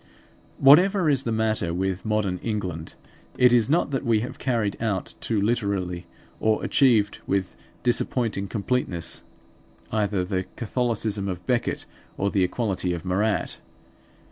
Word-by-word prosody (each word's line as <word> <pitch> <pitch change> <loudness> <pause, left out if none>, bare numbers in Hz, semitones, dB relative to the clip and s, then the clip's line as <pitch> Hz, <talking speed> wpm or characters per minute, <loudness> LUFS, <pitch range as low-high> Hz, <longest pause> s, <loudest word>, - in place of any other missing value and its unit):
Whatever 175 +4 +6
is 135 -2 +2
the 115 - 0
matter 110 -6 +1
with 95 +2 -2
modern 105 -4 0
England 90 -8 -4 0.4
it 125 -1 +6
is 120 0 +4
not 160 -1 +2
that 135 - -1
we 115 -2 +2
have 125 - -6
carried 115 -6 0
out 105 -5 -2
too 110 -3 0
literally, 100 -5 -1 0.3
or 110 0 +1
achieved 115 -7 +3
with 95 -1 -1 0.3
disappointing 115 -4 0
completeness, 100 -5 -2 0.7
either 105 -4 0
the 95 -1 -2
Catholicism 110 -4 -1
of 90 -2 -5
Becket 125 -2 0 0.3
or 100 0 0
the 95 - +2
equality 95 -2 -1
of 85 +1 -6
Marat. 100 +4 0
105 Hz, 135 wpm, -25 LUFS, 95-120 Hz, 0.7 s, Whatever